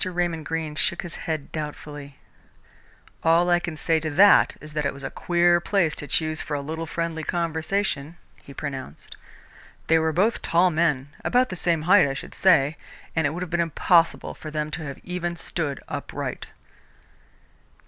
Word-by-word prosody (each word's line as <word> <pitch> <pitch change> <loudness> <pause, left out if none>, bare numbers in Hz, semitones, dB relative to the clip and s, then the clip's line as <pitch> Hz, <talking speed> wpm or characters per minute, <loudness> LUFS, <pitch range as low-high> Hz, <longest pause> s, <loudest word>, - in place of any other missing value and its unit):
Raymond 175 -4 -2
Greene 160 -2 -3
shook 170 +3 0
his 175 - -7
head 155 -3 -4
doubtfully. 145 -2 -7 1.1
"All 170 +2 +4
I 175 - +5
can 170 -3 -5
say 160 0 +1
to 155 0 -3
that 195 +7 +6
is 150 0 -11
that 150 -1 -1
it 140 -1 -1
was 140 - -10
a 135 - -4
queer 175 0 +3
place 175 -4 +1
to 145 - -6
choose 155 +3 0
for 150 - -3
a - - -1
little 160 +3 -5
friendly 165 0 -3
conversation," 165 -1 -1 0.2
he - - -13
pronounced. 135 - -7 0.7
"They 160 0 +4
were 160 0 +1
both 195 +8 +1
tall 175 +2 +3
men 150 -4 +1
about 250 +1 +2
the 185 - -4
same 170 -3 +1
height, 180 -1 +6
I 135 - -3
should - - -8
say 155 -6 +3 0.4
and 160 -3 +2
it - - 0
would 175 +5 -4
have 180 - -8
been 175 - 0
impossible 165 +1 +2
for 155 - -9
them 150 0 -3
to 160 - -4
have 140 -1 -6
even 175 -1 -3
stood 155 -5 -3
upright." - - -5
160 Hz, 180 wpm, -24 LUFS, 150-175 Hz, 1.1 s, that